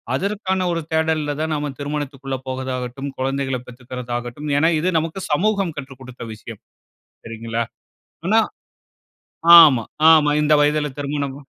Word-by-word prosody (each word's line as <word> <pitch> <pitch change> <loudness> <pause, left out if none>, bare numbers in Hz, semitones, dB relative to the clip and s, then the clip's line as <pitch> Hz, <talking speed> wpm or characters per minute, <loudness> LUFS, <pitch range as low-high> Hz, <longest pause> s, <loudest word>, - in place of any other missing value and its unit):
அதற்கான 190 +1 -1
ஒரு 165 -1 -1
தேடல்ல 160 -2 0
தான் 160 0 -1
நம்ம 145 -1 -3
திருமணத்திக்குள்ள 140 -2 -4
போவதாகட்டும், 130 +1 -4
குழந்தைகள 135 0 -1
பெத்துக்கறதாகட்டும். 125 +2 -6
ஏனா, 160 +3 +4
இது 175 +4 0
நமக்கு 165 +4 -5
சமூகம் 195 +1 +1
கற்றுக் 135 -2 -8
கொடுத்த 125 -2 -10
விஷயம். 110 0 -11 0.6
சரிங்களா? 115 0 -3 0.6
ஆனா 220 +3 +5 1.2
ஆமா, 140 -8 +6 0.3
ஆமா. 155 -2 +5
இந்த 150 0 +2
வயதுல 150 0 +2
திருமணம். 140 -1 -3
145 Hz, 120 wpm, -21 LUFS, 130-160 Hz, 1.2 s, ஆமா